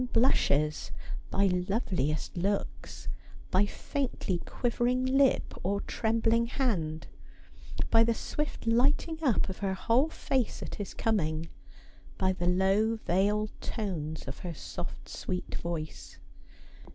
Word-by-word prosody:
blushes; 150 - +3 0.4
by 200 - +3 0.2
loveliest 170 - 0
looks; 195 +3 -2 0.4
by 195 +2 +4
faintly 245 - -2
quivering 245 +1 +1
lip 270 +1 +3
or 200 +2 0
trembling 230 +1 +1
hand; 175 - -1 0.9
by 225 0 +7
the 230 0 +2
swift 300 +2 -3
lighting 275 +7 +3
up 260 -9 +3
of 190 - -6
her 195 -1 0
whole 240 +10 +3
face 265 -6 -1
at - - -6
his 205 - -5
coming; 165 -7 0 0.7
by 190 -1 +2
the 175 -1 -2
low 195 +5 +3
veiled 210 +1 +1
tones 160 - -3
of 135 - -6
her 175 -2 -5
soft 175 - -6
sweet 180 -1 -4
voice. 165 -2 -5
205 Hz, 115 wpm, -30 LUFS, 175-235 Hz, 0.9 s, by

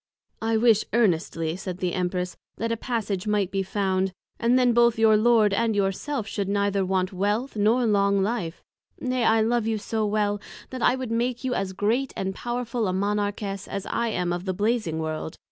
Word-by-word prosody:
I 225 0 +1
wish 220 -2 +4
earnestly, 165 -7 +1
said 185 -1 -5
the 180 -2 -2
Empress, 180 0 -2 0.2
that 230 +2 -2
a - - +1
Passage 215 -5 -3
might 205 -3 +1
be 195 - 0
found, 190 -1 0 0.3
and 240 +2 +3
then 250 -2 +4
both 235 -1 +4
your 220 -1 +5
Lord 215 -2 +4
and 220 +1 +1
your 195 -1 +2
self, 270 +3 -4
should 200 -2 -3
neither 200 -1 +1
want 185 0 0
Wealth, 205 +8 -1
nor 220 +4 +3
Long 200 -2 +3
life: 200 -6 -3 0.4
nay, 255 -1 -1
I 225 0 +4
love 230 0 +1
you 220 -1 0
so 220 +1 -2
well, 205 -1 0 0.3
that 255 -1 -5
I 245 - +4
would 260 -3 -5
make 240 +2 -1
you 260 -1 0
as 195 -4 -2
Great 230 +8 0
and 190 0 -2
Powerful 240 0 -2
a 185 - -1
Monarchess, 205 0 -2
as 200 -1 -4
I 235 - -1
am 180 -5 -1
of 175 +1 -4
the 185 -1 -2
Blazing 210 -5 0
World. 160 0 -4
210 Hz, 195 wpm, -25 LUFS, 190-230 Hz, 0.4 s, your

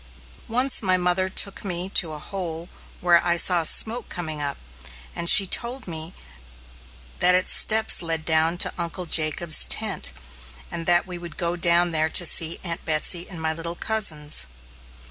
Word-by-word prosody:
Once 250 +3 +1
my 185 -3 0
mother 180 +1 -1
took 195 +1 -1
me 180 -2 -3
to 175 -4 +1
a - - -7
hole 170 0 -8 0.3
where 175 -1 +2
I 175 0 +1
saw 175 0 +3
smoke 225 +8 0
coming 155 -4 -5
up, 140 -1 -4 0.6
and 170 0 +1
she 195 - +8
told 240 +5 -2
me 160 +1 -4 1.0
that 180 0 +3
its 185 - 0
steps 220 0 +4
led 165 -2 -3
down 160 +1 0
to - - -7
Uncle 170 +2 -5
Jacob's 155 0 +2
tent, - - 0 0.6
and 165 -1 -7
that 175 0 +2
we 180 -2 -10
would 170 -3 -12
go 170 -1 -3
down 175 0 +1
there 160 0 -1
to 175 - +2
see 165 0 +3
Aunt 170 -2 -5
Betsy 165 +2 -1
and 180 -4 -9
my 160 0 -3
little 165 +1 -6
cousins. 155 - +2
175 Hz, 165 wpm, -22 LUFS, 160-185 Hz, 1.0 s, she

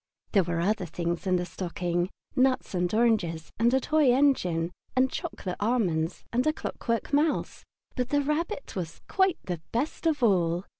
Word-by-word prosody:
There 200 - +5
were 170 -1 -2
other 195 0 0
things 170 +3 -3
in 185 - +3
the 180 0 0
stocking, 175 0 -2 0.3
nuts 260 -4 +2
and 180 -1 0
oranges 215 -8 +1
and 235 +1 +4
a 265 - +4
toy 300 -1 +3
engine, 180 -12 +2 0.2
and 260 0 +3
chocolate 180 -2 -4
almonds 185 -8 0
and 250 +4 +2
a 310 - +3
clockwork 230 -3 -3
mouse, 295 +2 +1 0.3
but 250 -1 -1
the 290 +1 +2
Rabbit 300 +1 -2
was 170 -3 -5
quite 380 -2 +2
the 175 -3 -4
best 285 +7 -1
of 295 -5 +1
all. 180 -4 +2
215 Hz, 165 wpm, -28 LUFS, 175-265 Hz, 0.3 s, There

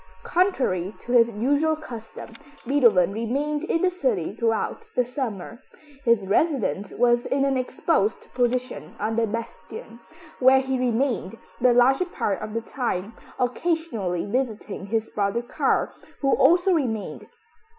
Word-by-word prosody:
Contrary 255 - 0
to 245 - -8
his 235 -1 +5
usual 285 +8 +1
custom, 235 -7 -9 0.3
Beethoven 230 -9 +4
remained 280 +7 -2
in 330 0 0
the 370 - +3
city 235 - -1
throughout 230 - -1
the 250 - +2
summer. 235 -3 -5 0.4
His 235 -5 +3
residence 215 - 0
was 240 0 +2
in 275 0 +1
an 275 -1 +1
exposed 255 - -1
position 250 +1 -2
on 215 +2 -1
the 230 0 +1
bastion, 230 +1 -7 0.4
where 265 +1 +6
he 265 -1 -2
remained 240 -4 0 0.2
the 250 0 +4
larger 265 +8 +4
part 210 - -2
of 215 +1 -6
the 230 - 0
time, 230 -4 -3 0.2
occasionally 250 - -1
visiting 215 -4 -3
his 220 +1 -1
brother 210 +3 -1
Karl, 240 - 0 0.3
who 275 -1 +2
also 360 +2 +4
remained. 235 - -2
240 Hz, 135 wpm, -24 LUFS, 220-275 Hz, 0.4 s, where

